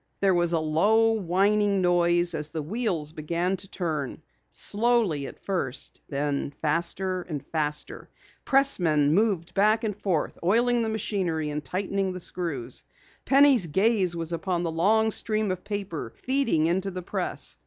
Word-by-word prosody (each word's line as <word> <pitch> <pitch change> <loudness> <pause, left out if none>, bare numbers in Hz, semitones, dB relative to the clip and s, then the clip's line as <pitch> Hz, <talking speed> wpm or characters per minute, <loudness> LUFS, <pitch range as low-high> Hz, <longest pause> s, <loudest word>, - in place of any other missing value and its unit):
There 195 -1 +3
was 175 -1 +1
a 165 - +2
low, 205 +9 +3
whining 200 0 +1
noise 175 -1 +2
as 150 -1 0
the 155 -1 -4
wheels 170 -5 -2
began 170 +4 -1
to 195 - -6
turn, 155 -7 -4 0.3
slowly 210 - +1
at - - -11
first, 180 -10 -3
then 140 0 -2
faster 175 +4 0
and 155 -6 -6
faster. 150 -2 -3 0.3
Pressmen 170 - +3
moved 195 -4 +1
back 215 +3 +3
and 210 -3 -2
forth, 185 -6 -2
oiling 235 +6 +2
the 225 - -1
machinery 180 -8 -2
and 150 0 -4
tightening 190 +4 -2
screws. 150 -9 -2 0.4
Penny's 275 -8 +5
gaze 190 +1 +2
was 165 0 0
upon 175 0 -2
the 165 - -2
long 220 +7 +2
stream 215 -2 0
of 185 -1 -5
paper 195 - -5
feeding 260 - 0
into 185 +4 0
the 185 -1 -6
press. - - -2
180 Hz, 145 wpm, -26 LUFS, 160-210 Hz, 0.4 s, Penny's